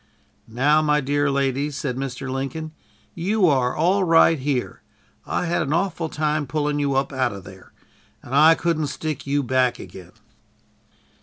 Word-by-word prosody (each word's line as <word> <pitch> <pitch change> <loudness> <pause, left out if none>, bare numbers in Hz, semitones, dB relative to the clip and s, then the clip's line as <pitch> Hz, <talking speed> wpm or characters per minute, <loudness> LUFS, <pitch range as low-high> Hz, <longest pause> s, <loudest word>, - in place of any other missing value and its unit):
"Now, 145 +7 +2
my 150 -1 +2
dear 145 +1 0
lady," 140 +1 0
said 140 -3 -4
Mr. 135 0 -5
Lincoln. 135 +4 -4 0.4
"You 195 +4 +1
are 130 -5 +1
all 185 +5 +2
right 165 -2 +4
here. 130 -2 -3 0.5
I - - -1
had 175 0 0
an 140 - -1
awful 170 -2 -1
time 150 -1 -1
pulling 145 +1 -1
you 140 -2 0
up 135 +1 -1
out 130 -5 0
of 100 -1 -9
there, 95 0 -14 0.5
and 125 - -9
I 155 +3 +6
couldn't 165 -3 -1
stick 150 -1 -5
you 140 +1 0
back 125 -1 +1
again!" 90 -3 -12
145 Hz, 160 wpm, -22 LUFS, 130-155 Hz, 0.5 s, I